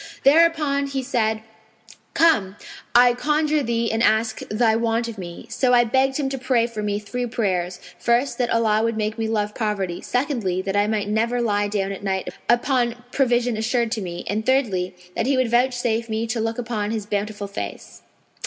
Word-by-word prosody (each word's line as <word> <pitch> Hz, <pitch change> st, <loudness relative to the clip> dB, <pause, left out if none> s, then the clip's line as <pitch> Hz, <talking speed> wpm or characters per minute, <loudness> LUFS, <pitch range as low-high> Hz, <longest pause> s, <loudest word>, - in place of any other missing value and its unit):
Thereupon 295 Hz, -2 st, +4 dB
he 275 Hz, -1 st, -3 dB
said, 220 Hz, -4 st, 0 dB, 0.7 s
'Come, 215 Hz, -, +3 dB, 0.4 s
I 245 Hz, 0 st, +7 dB
conjure 300 Hz, +3 st, +1 dB
thee 230 Hz, -2 st, 0 dB
and 225 Hz, -, 0 dB
ask 220 Hz, 0 st, +2 dB
thy 220 Hz, +1 st, +2 dB
want 230 Hz, +1 st, 0 dB
of 225 Hz, -3 st, -7 dB
me.' 175 Hz, -2 st, -8 dB
So 250 Hz, -2 st, +3 dB
I 240 Hz, -, +6 dB
begged 265 Hz, +3 st, +1 dB
him 285 Hz, -3 st, -1 dB
to 270 Hz, -1 st, -4 dB
pray 250 Hz, -2 st, +2 dB
for 230 Hz, -3 st, -5 dB
me 205 Hz, -1 st, -1 dB
three 245 Hz, +4 st, -4 dB
prayers; 185 Hz, -6 st, -1 dB, 0.2 s
first, 240 Hz, +6 st, +1 dB
that 245 Hz, -1 st, +1 dB
Allah 220 Hz, -2 st, +2 dB
would 230 Hz, 0 st, 0 dB
make 215 Hz, +1 st, -2 dB
me 225 Hz, -, 0 dB
love 210 Hz, -2 st, -1 dB
poverty; 200 Hz, -6 st, -2 dB
secondly, 245 Hz, -9 st, -1 dB
that 195 Hz, 0 st, -2 dB
I 205 Hz, +1 st, +3 dB
might 210 Hz, -2 st, -1 dB
never 230 Hz, +3 st, 0 dB
lie 205 Hz, -3 st, +1 dB
down 200 Hz, -1 st, -1 dB
at 195 Hz, +1 st, -7 dB
night 190 Hz, -1 st, -2 dB, 0.2 s
upon 240 Hz, 0 st, +1 dB
provision 245 Hz, -3 st, +1 dB
assured 235 Hz, +1 st, 0 dB
to 225 Hz, -3 st, -2 dB
me; 175 Hz, -2 st, -6 dB
and 210 Hz, +2 st, -2 dB
thirdly, 210 Hz, -9 st, +1 dB, 0.2 s
that 225 Hz, -, 0 dB
He 275 Hz, -1 st, +2 dB
would 255 Hz, -3 st, +1 dB
vouchsafe 240 Hz, -2 st, +1 dB
me 220 Hz, +1 st, -1 dB
to 230 Hz, +1 st, -2 dB
look 225 Hz, +1 st, -2 dB
upon 220 Hz, -4 st, -2 dB
His 220 Hz, -2 st, -3 dB
bountiful 205 Hz, 0 st, -3 dB
Face. 195 Hz, -, -7 dB
230 Hz, 190 wpm, -22 LUFS, 210-245 Hz, 0.7 s, I